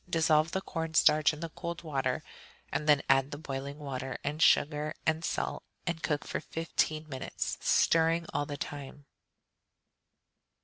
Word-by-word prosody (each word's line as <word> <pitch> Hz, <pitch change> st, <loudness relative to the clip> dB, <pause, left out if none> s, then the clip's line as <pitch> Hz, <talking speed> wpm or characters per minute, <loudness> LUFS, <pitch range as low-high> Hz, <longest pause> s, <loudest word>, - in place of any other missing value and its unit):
Dissolve 160 Hz, -2 st, +3 dB
the 190 Hz, -, -2 dB
corn 165 Hz, -3 st, -4 dB
starch 150 Hz, -1 st, +5 dB
in 150 Hz, 0 st, -9 dB
the 165 Hz, -, -3 dB
cold 170 Hz, +2 st, -6 dB
water, 135 Hz, -5 st, -1 dB, 0.5 s
and 150 Hz, -, -1 dB
then 145 Hz, -2 st, +5 dB
add 135 Hz, 0 st, +4 dB
the 145 Hz, -, -6 dB
boiling 140 Hz, -1 st, -5 dB
water 135 Hz, -3 st, -4 dB
and 150 Hz, +3 st, -3 dB
sugar 150 Hz, -1 st, +3 dB
and 160 Hz, +1 st, +1 dB
salt, -, -, -2 dB, 0.2 s
and 170 Hz, -2 st, -2 dB
cook 150 Hz, -1 st, -1 dB
for -, -, -2 dB
fifteen 155 Hz, -1 st, -1 dB
minutes, 130 Hz, -3 st, -4 dB
stirring 165 Hz, +1 st, +3 dB
all 145 Hz, 0 st, 0 dB
the 145 Hz, -, -5 dB
time. 145 Hz, 0 st, -7 dB
150 Hz, 150 wpm, -31 LUFS, 140-160 Hz, 0.5 s, starch